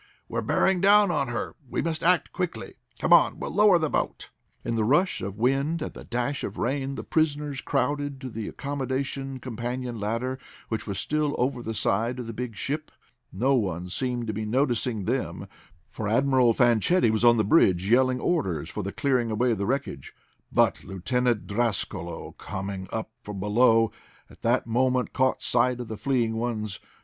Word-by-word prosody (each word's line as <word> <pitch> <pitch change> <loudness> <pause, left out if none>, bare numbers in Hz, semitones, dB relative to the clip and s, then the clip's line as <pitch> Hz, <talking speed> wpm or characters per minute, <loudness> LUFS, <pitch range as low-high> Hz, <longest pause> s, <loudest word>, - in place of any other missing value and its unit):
"We're - - -2
bearing 190 -2 +2
down 200 -1 +6
on 140 -5 0
her! 120 -1 -4
We - - -1
must 165 -2 -2
act 175 -2 +3
quickly. 180 -2 -4 0.2
Come - - +3
on, - - +5
we'll - - -5
lower 205 -3 +6
the 160 -2 0
boat!" - - -2 0.3
In 115 - -1
the 115 -1 +1
rush 150 - +2
of 100 +2 -5
wind 135 +7 +1
and - - -6
the - - -10
dash 125 +4 -2
of 100 - -5
rain 135 +2 -1
the - - -5
prisoners 150 -3 0
crowded 145 +1 -1
to 130 - -5
the 110 -1 -5
accommodation 135 -1 -3
companion 120 0 -4
ladder, 115 +5 -2 0.3
which 110 -2 -3
was 100 -2 -3
still 150 -1 0
over 125 0 0
the 115 -1 -4
side 110 +4 0
of 125 - -5
the 115 - -6
big 120 0 -5
ship. 150 +8 -3 0.4
No 125 +9 +1
one 90 -7 -1
seemed 125 +3 -2
to 110 - -3
be 110 +2 -3
noticing 120 -2 0
them, - - -2 0.4
for 110 - -5
Admiral 125 +2 +4
Fanchetti 120 - +3
was 110 +1 0
on 120 -1 +6
the 110 - +3
bridge, 95 - +3
yelling 130 +2 +3
orders 95 - -1
for - - -4
the - - -4
clearing 125 -4 +1
away 120 +3 +1
of 110 - -1
the 100 - -1
wreckage. 130 - -3 0.4
But - - +2
Lieutenant 120 +4 -1
Drascalo, 110 -1 -2
coming 95 -1 -5
up 110 0 -4
from 105 -1 -7
below 115 +2 +4 0.4
at - - -18
that 120 +2 +2
moment, 125 +2 +1
caught 130 -1 +1
sight 125 +1 +2
of 120 - -6
the 110 - -4
fleeing 115 0 0
ones. 110 -4 -3
125 Hz, 180 wpm, -26 LUFS, 110-140 Hz, 0.4 s, down